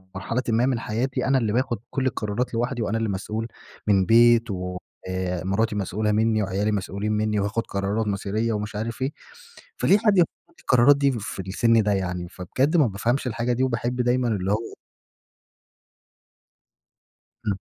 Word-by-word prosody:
مرحلةً 115 +7 -2
ما 115 +2 +3
من 130 -3 0
حياتي. 120 +4 -2
أنا 135 -1 +3
اللي 110 -4 0
باخد 120 -2 0
كل 135 -2 -2
القرارات 115 0 -2
لوحدي، 120 +1 -1
وأنا 110 +1 -1
اللي 115 -2 -1
مسؤول 105 +4 -3 0.4
من 95 -2 +4
بيت 115 -1 +5
و 90 -1 -4 0.3
آآ 90 -1 -2
مراتي 105 +4 0
مسؤولة 105 +2 -1
مِنّي 110 0 +2
وعيالي 100 +2 -1
مسؤولين 100 +1 -2
مِنّي 105 0 0
وهاخد 100 +3 -1
قرارات 100 +3 -1
مصيرية، 105 +3 -1
ومش 105 0 -4
عارف 115 +4 -4
إيه. 135 - 0 0.7
فليه 200 - +4
حد 210 -2 +2
ياخد 170 - +5 0.2
لي - - -28
القرارات 130 +3 +5
دي 140 -1 +3
في 105 -5 -5
السن 110 +4 +2
ده 105 - +1
يعني؟ 90 -2 -3
فبجد 130 - 0
ما 145 -6 +5
بافهمش 120 +7 -1
الحاجة 120 +1 -1
دي 130 +2 0
وباحب 125 0 -1
دايمًا 125 0 +1
اللي 100 -3 -1
هو 110 +2 -2 2.7
امم. 100 -2 0
110 Hz, 165 wpm, -24 LUFS, 100-120 Hz, 2.7 s, بيت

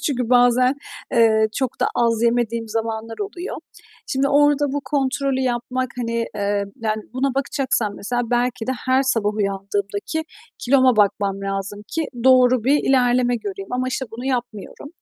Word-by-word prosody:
Çünkü 250 -4 -1
bazen, 250 +1 +4 0.4
eee, 220 -2 +4
çok 260 -3 -2
da - - +3
az 230 -1 +1
yemediğim 235 -1 0
zamanlar 225 0 -3
oluyor. 395 -2 -5 0.5
Şimdi 275 0 +1
orada 290 0 +3
bu 285 - -1
kontrolü 275 -1 0
yapmak, 250 0 -2
hani, 230 -1 -1
eee, 200 0 0 0.2
yani 215 -1 -1
buna 265 0 0
bakacaksam 265 -6 -1
mesela 245 +4 -2
belki 240 -1 0
de - - +2
her 260 +1 +3
sabah 220 -5 0
uyandığımdaki 200 +7 -2 0.3
kiloma 260 -2 +3
bakmam 200 -1 +1
lazım 195 +1 -4
ki 325 -1 -2 0.2
doğru 255 -2 +5
bir 285 +3 +3
ilerleme 245 -1 +3
göreyim 390 - -7
ama 255 +1 -1
işte 260 0 -3
bunu 240 +3 -7
yapmıyorum. 245 0 -4
245 Hz, 150 wpm, -21 LUFS, 220-265 Hz, 0.5 s, doğru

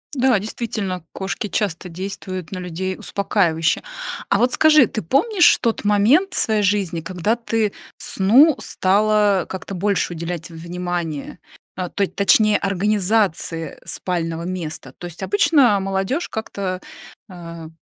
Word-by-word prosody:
Да, 255 -5 +3
действительно, 205 -4 -4
кошки 195 +3 -4
часто 190 -2 -2
действуют 185 0 -6
на 185 - -5
людей 180 +1 -4
успокаивающе. 180 -4 +1 0.5
А 200 - +2
вот 250 +1 +3
скажи, 305 -5 +6
ты 215 - -5
помнишь 345 - +4
тот 230 -3 -1
момент 230 - +3
своей 215 -2 +2
жизни, 185 -4 0
когда 185 +6 -1
ты 225 -3 -1 0.2
сну 255 +11 +4
стала 205 0 +2
как-то 190 +1 -6
больше 195 -1 0
уделять 170 +1 -5
внимания, 170 -2 -5 0.4
э, 180 -2 -3
точ 200 -2 0
точнее, 210 +1 +4
организации 195 -4 0
спального 165 -2 -3
места? 165 -7 -6
То 175 - -8
есть 175 +2 -9
обычно 210 - +3
молодежь 195 - -2
как-то, 195 -4 -4 0.5
э, 170 -2 -9
195 Hz, 125 wpm, -20 LUFS, 175-215 Hz, 0.5 s, скажи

